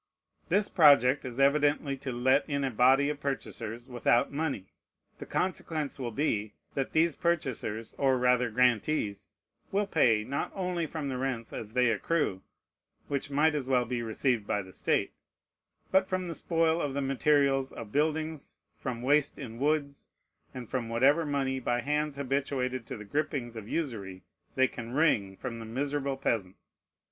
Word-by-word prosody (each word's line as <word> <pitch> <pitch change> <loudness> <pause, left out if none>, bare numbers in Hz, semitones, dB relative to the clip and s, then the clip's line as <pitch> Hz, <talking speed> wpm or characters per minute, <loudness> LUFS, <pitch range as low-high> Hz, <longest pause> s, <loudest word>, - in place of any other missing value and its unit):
This 205 0 +3
project 140 -5 +5
is 125 0 -6
evidently 145 0 +3
to 135 0 -5
let 130 +3 +3
in 140 -1 0
a 135 - 0
body 130 +5 +4
of 145 - -6
purchasers 120 -4 -4
without 120 0 +2
money. 140 - -3 0.5
The - - -8
consequence 160 -6 -2
will 125 -2 -2
be, 110 -4 -1 0.2
that 135 -1 -1
these 160 0 +3
purchasers, 125 -10 -2
or 135 -2 +3
rather 125 -1 +3
grantees, 115 -2 +1 0.4
will 205 +1 +1
pay, 120 - +3
not 140 +5 -3
only 180 -3 -1
from 155 -2 -4
the 130 -2 -3
rents 125 -4 -3
as 110 -1 -6
they 125 -2 +3
accrue, 115 - 0 0.7
which 140 0 -2
might 150 +3 +3
as 145 -4 -2
well 125 -2 +2
be 120 0 -2
received 115 -1 0
by 105 - 0
the 95 0 -14
state, - - 0 0.8
but 190 0 +4
from 185 -1 -2
the 170 - -4
spoil 165 0 +1
of 140 -2 -2
the 140 - 0
materials 135 0 +2
of 110 -3 -9
buildings, 155 +1 -1 0.2
from 120 -1 -5
waste 145 +2 +2
in 115 -4 -8
woods, 145 0 -1 0.4
and 125 -2 -8
from 120 -2 -3
whatever 140 +7 +3
money, 135 -2 0
by 120 -1 0
hands 150 +2 -1
habituated 130 -3 -2
to - - -5
the 105 - -9
gripings 135 -1 -2
of 110 -1 -8
usury, 105 - -4 0.3
they 130 0 +4
can 120 -1 -8
wring 110 -11 +2
from 120 -3 -5
the 115 - -7
miserable 140 +3 -2
peasant. 105 -8 -1
135 Hz, 165 wpm, -29 LUFS, 120-150 Hz, 0.8 s, project